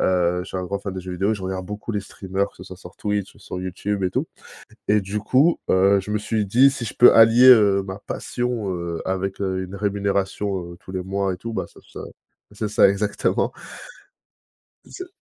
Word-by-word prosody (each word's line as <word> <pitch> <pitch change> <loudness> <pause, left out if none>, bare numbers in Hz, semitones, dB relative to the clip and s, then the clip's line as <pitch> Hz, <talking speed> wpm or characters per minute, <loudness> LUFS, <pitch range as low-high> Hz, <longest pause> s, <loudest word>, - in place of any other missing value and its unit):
Heu, 90 -1 +1
je - - -6
suis - - -6
un 90 - -3
grand 100 +2 -3
fan 100 -3 -5
de 95 - -6
jeux 90 0 -7
vidéo. 95 +4 0
Et - - 0
je 100 - -8
regarde 95 0 -4
beaucoup 105 +3 -6
les 105 - -1
streamers 100 0 -3
que - - -27
ça 90 - -11
soit 95 0 -10
sur 90 0 -14
Twitch 105 -2 -3
ou - - -20
sur 90 -2 -7
YouTube 95 +2 -3
et 90 - 0
tout. - - -1 0.6
Et 105 0 +3
du 100 +2 -4
coup, 140 +10 +3
heu, 100 +1 +4
je 95 +2 -8
me 105 - +1
suis 105 0 -1
dit: 125 +8 +5
«Si 130 -4 -5
je 105 - -5
peux 120 - +7
allier, 115 +3 +7
heu, 100 -5 +6
ma 95 +1 -7
passion, 120 -1 -3
heu, 85 -1 -4
avec, 95 +1 -3
heu, 95 -1 -1
une 95 +1 -8
rémunération, 100 -2 -2
heu, - - -14
tous 95 - -12
les 95 -1 -3
mois 95 0 -1
et - - -7
tout, 115 +4 -7
bah, - - -2
ça - - -18
ça» - - -8 0.5
c'est 105 +1 -3
ça, 105 - +5
exactement. 100 +1 0 1.4
C'est 370 -1 -9
100 Hz, 230 wpm, -22 LUFS, 95-105 Hz, 1.4 s, peux